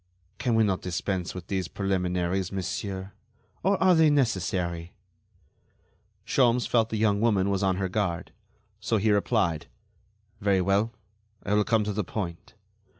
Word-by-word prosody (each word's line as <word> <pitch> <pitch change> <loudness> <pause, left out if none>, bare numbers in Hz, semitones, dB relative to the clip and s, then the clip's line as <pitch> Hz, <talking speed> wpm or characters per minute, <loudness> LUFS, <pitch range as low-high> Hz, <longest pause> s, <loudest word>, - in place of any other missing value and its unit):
"Can 120 -3 +1
we 115 - +4
not 95 -3 0
dispense 90 +1 -3
with 90 -2 -7
these 95 -2 -2
preliminaries, 90 -1 -1
monsieur? 95 0 -4 0.5
Or 195 +1 +2
are 185 -1 +5
they 160 -2 +5
necessary?" 95 - 0 1.3
Sholmes 125 -2 +3
felt 115 -2 +2
the 110 - -2
young 105 -1 +2
woman 100 -4 +2
was 100 0 0
on 95 -2 +2
her 95 0 -1
guard, 95 -3 -2 0.5
so 115 - 0
he 105 +1 +2
replied: 100 -6 +1 0.7
"Very 100 -2 +2
well; 100 +4 +1 0.5
I 100 - -1
will 105 0 +4
come 110 0 +2
to 105 0 -2
the 105 +1 -1
point. 85 -3 -6
100 Hz, 150 wpm, -27 LUFS, 90-110 Hz, 1.3 s, are